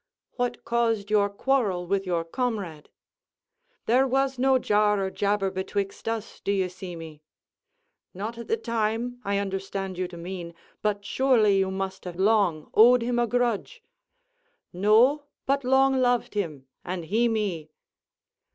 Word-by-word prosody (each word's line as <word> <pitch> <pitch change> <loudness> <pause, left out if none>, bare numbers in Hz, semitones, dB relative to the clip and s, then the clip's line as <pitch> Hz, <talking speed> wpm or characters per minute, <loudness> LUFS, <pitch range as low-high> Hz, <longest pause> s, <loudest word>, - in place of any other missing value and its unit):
"What 245 -1 -3
caused 225 -3 0
your 205 -1 +3
quarrel 200 -5 0
with 195 +1 -1
your 170 -2 0
comrade?" 195 - -3 1.0
"There 255 +4 +3
was 270 0 0
no 265 0 +4
jar 210 -3 +2
or 190 -1 -2
jabber 200 -1 0
betwixt 195 +2 -4
us, 225 -1 -5
d'you 195 -2 0
see 180 -1 -8
me." 160 -2 -10 0.9
"Not 220 +5 -6
at 235 - -8
the 450 - +1
time, 235 - -2
I 200 0 0
understand 195 -1 -4
you 185 - -1
to 175 -1 -11
mean; 170 -1 -7 0.3
but 205 -1 -1
surely 220 -5 +3
you 190 0 +1
must 190 0 -4
have 180 -1 -6
long 190 -5 +1
owed 240 +2 +6
him 240 0 0
a 240 - +2
grudge?" 240 -2 -1 0.9
"No, 225 +10 +4 0.2
but 275 0 +1
long 265 +1 +3
loved 245 -2 +1
him; 160 -10 -3 0.2
and 175 -2 -4
he 225 +7 +2
me." 200 -9 -2
205 Hz, 145 wpm, -26 LUFS, 190-240 Hz, 1.0 s, owed